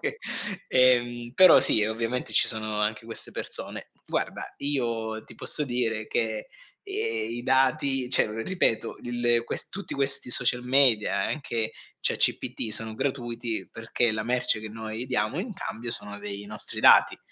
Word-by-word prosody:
poche 450 Hz, -, -4 dB, 0.5 s
ehm 120 Hz, -2 st, +2 dB
però 185 Hz, 0 st, +7 dB
sì 110 Hz, -, +6 dB
ovviamente 115 Hz, +3 st, -3 dB
ci -, -, +5 dB
sono 110 Hz, -2 st, 0 dB
anche 105 Hz, +1 st, -2 dB
queste 115 Hz, 0 st, -3 dB
persone. -, -, -4 dB, 0.2 s
Guarda -, -, -3 dB
io 115 Hz, -6 st, -2 dB
ti -, -, -15 dB
posso 150 Hz, -, +5 dB
dire 115 Hz, -4 st, -2 dB
che, 110 Hz, -2 st, -2 dB, 0.4 s
ehm, 110 Hz, -1 st, -3 dB
i 120 Hz, +1 st, -5 dB
dati, 135 Hz, 0 st, +1 dB
cioè 115 Hz, -, +3 dB
o 105 Hz, -, -8 dB
ripeto, 145 Hz, -12 st, 0 dB
il, 120 Hz, 0 st, -3 dB
ehm, 120 Hz, -1 st, +3 dB
ques -, -, -5 dB
tutti 200 Hz, +1 st, -7 dB
questi 135 Hz, -2 st, 0 dB
social 125 Hz, 0 st, +4 dB
media, 125 Hz, -4 st, +3 dB
anche 120 Hz, -7 st, -3 dB, 0.3 s
ChatGPT, 110 Hz, -, +1 dB
sono 110 Hz, +1 st, 0 dB
gratuiti 120 Hz, -3 st, -4 dB
perché 115 Hz, 0 st, -1 dB
la 110 Hz, 0 st, -3 dB
merce 125 Hz, -1 st, 0 dB
che 110 Hz, -, -8 dB
noi 110 Hz, +2 st, -6 dB
diamo 125 Hz, +4 st, -2 dB
in 220 Hz, +3 st, -6 dB
cambio 120 Hz, -, -7 dB
sono 105 Hz, -2 st, -3 dB
dei 100 Hz, 0 st, -7 dB
nostri 105 Hz, 0 st, -3 dB
dati. -, -, +5 dB
120 Hz, 155 wpm, -26 LUFS, 110-125 Hz, 0.5 s, però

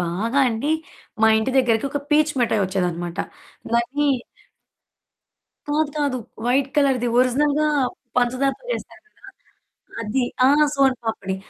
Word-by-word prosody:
బాగా 195 Hz, +10 st, -1 dB
అండి 230 Hz, +5 st, -3 dB, 0.5 s
మా 220 Hz, -, +7 dB
ఇంటి 220 Hz, +4 st, -1 dB
దగ్గరకొక 255 Hz, +3 st, +1 dB
పీచు 300 Hz, 0 st, +3 dB
మిటాయోచ్చేదనమాట. 180 Hz, -6 st, -1 dB, 0.6 s
దాన్ని 255 Hz, +5 st, +1 dB, 1.6 s
కాదు, 300 Hz, 0 st, +1 dB
కాదు. 280 Hz, -4 st, 0 dB, 0.3 s
వైట్ 270 Hz, +2 st, +2 dB
కలర్‌ది 270 Hz, -4 st, +2 dB
ఒరిజినల్‌గా 290 Hz, +4 st, +2 dB, 0.5 s
పంచదారతో 255 Hz, -, 0 dB
చేస్తారు -, -, -7 dB
కదా! 425 Hz, -, -17 dB, 0.7 s
అది 230 Hz, +4 st, -1 dB, 0.2 s
ఆహ్, 290 Hz, +3 st, +5 dB
సోను 270 Hz, -2 st, +3 dB
పాపిడి. 195 Hz, -4 st, -3 dB
255 Hz, 105 wpm, -22 LUFS, 220-285 Hz, 1.6 s, మా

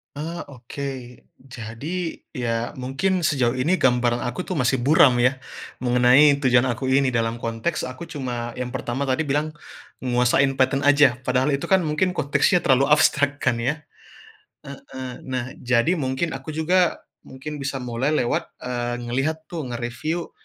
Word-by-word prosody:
Eee, 165 Hz, +4 st, -5 dB
oke. 140 Hz, +1 st, -8 dB, 0.6 s
Jadi, 135 Hz, +8 st, -6 dB, 0.2 s
ya, 115 Hz, -1 st, -1 dB
mungkin 150 Hz, +8 st, -1 dB
sejauh 130 Hz, -5 st, +1 dB
ini 165 Hz, +9 st, +1 dB
gambaran 120 Hz, -1 st, +2 dB
aku, 150 Hz, +10 st, -4 dB
tuh, -, -, -4 dB
masih 130 Hz, -4 st, +1 dB
buram, 135 Hz, 0 st, +5 dB
ya, 125 Hz, +2 st, +2 dB, 0.4 s
mengenai 125 Hz, +4 st, +5 dB
tujuan 130 Hz, -2 st, +3 dB
aku 120 Hz, +3 st, -3 dB
ini 135 Hz, +1 st, +3 dB
dalam 115 Hz, -1 st, -1 dB
konteks 115 Hz, +8 st, -2 dB
aku 130 Hz, +6 st, -6 dB
cuma, 120 Hz, -6 st, -5 dB
yang 125 Hz, 0 st, -4 dB
pertama 130 Hz, +2 st, -3 dB
tadi 130 Hz, +5 st, +1 dB
bilang 150 Hz, +2 st, 0 dB, 0.6 s
nguasain 125 Hz, +2 st, +2 dB
Python 135 Hz, +1 st, +1 dB
aja, 145 Hz, -3 st, +5 dB
padahal 130 Hz, +2 st, +1 dB
itu, -, -, -5 dB
kan, 190 Hz, -1 st, +3 dB
mungkin 165 Hz, +3 st, 0 dB
konteksnya 175 Hz, +3 st, +2 dB
terlalu 135 Hz, +3 st, +4 dB
abstrak, 145 Hz, -1 st, +2 dB
kan, 120 Hz, -, +1 dB
ya. 135 Hz, +7 st, -2 dB, 0.8 s
Heeh, 130 Hz, -2 st, -8 dB
nah, 130 Hz, 0 st, -3 dB
jadi 125 Hz, +8 st, +1 dB
mungkin 130 Hz, +4 st, -1 dB
aku 135 Hz, +2 st, -6 dB
juga, 175 Hz, +3 st, +1 dB, 0.2 s
mungkin 145 Hz, +3 st, -7 dB
bisa 135 Hz, -2 st, -4 dB
mulai 125 Hz, +5 st, -1 dB
lewat, 120 Hz, -5 st, -1 dB
eee, 120 Hz, -1 st, -3 dB
ngelihat, 135 Hz, +7 st, -2 dB
tuh, 160 Hz, -6 st, -4 dB
nge-review, 120 Hz, +8 st, -4 dB
130 Hz, 150 wpm, -23 LUFS, 125-150 Hz, 0.8 s, buram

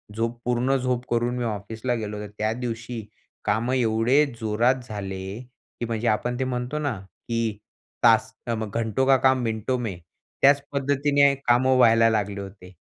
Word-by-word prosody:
झोप 115 Hz, +1 st, -2 dB
पूर्ण 125 Hz, +2 st, +1 dB
झोप 125 Hz, -1 st, -1 dB
करून 120 Hz, +1 st, +1 dB
मी 125 Hz, -, -2 dB
ऑफिसला 110 Hz, +3 st, -3 dB
गेलो 105 Hz, -2 st, -4 dB
तर -, -, -10 dB
त्या 110 Hz, +1 st, 0 dB
दिवशी 115 Hz, -1 st, -5 dB, 0.4 s
कामं 110 Hz, +5 st, +1 dB
एवढे 120 Hz, +4 st, +3 dB
जोरात 115 Hz, +4 st, +2 dB
झाले, 95 Hz, 0 st, -5 dB
की 125 Hz, -1 st, -10 dB
म्हणजे 115 Hz, 0 st, -2 dB
आपण 120 Hz, +3 st, 0 dB
ते -, -, +1 dB
म्हणतो 125 Hz, +3 st, -3 dB
ना 140 Hz, -9 st, -2 dB
की 115 Hz, +1 st, -3 dB, 0.5 s
तास 115 Hz, -1 st, +4 dB
अ, 120 Hz, -, 0 dB
म 110 Hz, -1 st, -4 dB
"घंटो 115 Hz, +4 st, 0 dB
का 135 Hz, -1 st, +6 dB
काम 130 Hz, 0 st, +3 dB
मिनटों 110 Hz, +2 st, -1 dB
में" 110 Hz, -7 st, -4 dB, 0.4 s
त्याच 140 Hz, +1 st, +6 dB
पद्धतीने 140 Hz, 0 st, +3 dB
कामं 130 Hz, +2 st, +4 dB
व्हायला 115 Hz, -2 st, +6 dB
लागले 100 Hz, -2 st, -1 dB
होते. 95 Hz, -2 st, -11 dB
115 Hz, 165 wpm, -24 LUFS, 110-125 Hz, 0.5 s, का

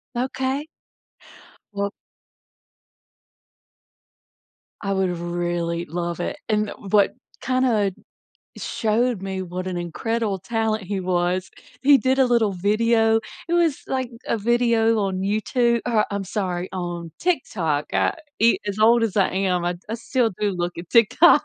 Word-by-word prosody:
Okay. 260 Hz, +3 st, -1 dB, 1.1 s
Well 200 Hz, 0 st, -2 dB, 2.9 s
I 195 Hz, -1 st, -1 dB
would 185 Hz, -2 st, 0 dB
really 175 Hz, 0 st, -2 dB
love 170 Hz, +1 st, -3 dB
it, 180 Hz, -, -3 dB
and 215 Hz, 0 st, +2 dB
the -, -, -6 dB, 0.2 s
what 200 Hz, 0 st, +3 dB, 0.3 s
kinda 250 Hz, -6 st, +2 dB, 0.7 s
showed 225 Hz, -1 st, 0 dB
me 190 Hz, -1 st, -3 dB
what 180 Hz, 0 st, -5 dB
an 185 Hz, -1 st, -3 dB
incredible 205 Hz, +4 st, -2 dB
talent 220 Hz, +2 st, -1 dB
he 195 Hz, +1 st, -3 dB
was, 180 Hz, 0 st, 0 dB, 0.3 s
he 280 Hz, +1 st, +7 dB
did 265 Hz, 0 st, +1 dB
a 265 Hz, -, +6 dB
little 235 Hz, -4 st, +2 dB
video, 225 Hz, +4 st, +2 dB, 0.3 s
it 340 Hz, -, -1 dB
was 335 Hz, -4 st, +2 dB
like 260 Hz, -2 st, -1 dB, 0.2 s
a 230 Hz, -, +1 dB
video 230 Hz, 0 st, +2 dB
on 190 Hz, -2 st, -1 dB
YouTu 235 Hz, +4 st, +1 dB
or 225 Hz, -3 st, +2 dB
I'm 200 Hz, -1 st, -2 dB
sorry, 185 Hz, -2 st, -2 dB
on 175 Hz, -2 st, -4 dB
TikTok, 175 Hz, -, 0 dB
uh, -, -, +3 dB, 0.3 s
e 230 Hz, +1 st, +5 dB
as 205 Hz, 0 st, -3 dB
old 230 Hz, +2 st, +5 dB
as 215 Hz, -4 st, -1 dB
I 195 Hz, -2 st, +3 dB
am, 185 Hz, -2 st, 0 dB
I'd 175 Hz, 0 st, -2 dB
I 225 Hz, -, -2 dB
still 235 Hz, -1 st, 0 dB
do 210 Hz, -1 st, 0 dB
look 175 Hz, -1 st, -2 dB
at 170 Hz, 0 st, -8 dB
TikTok. 235 Hz, -, +6 dB
205 Hz, 140 wpm, -23 LUFS, 180-235 Hz, 2.9 s, he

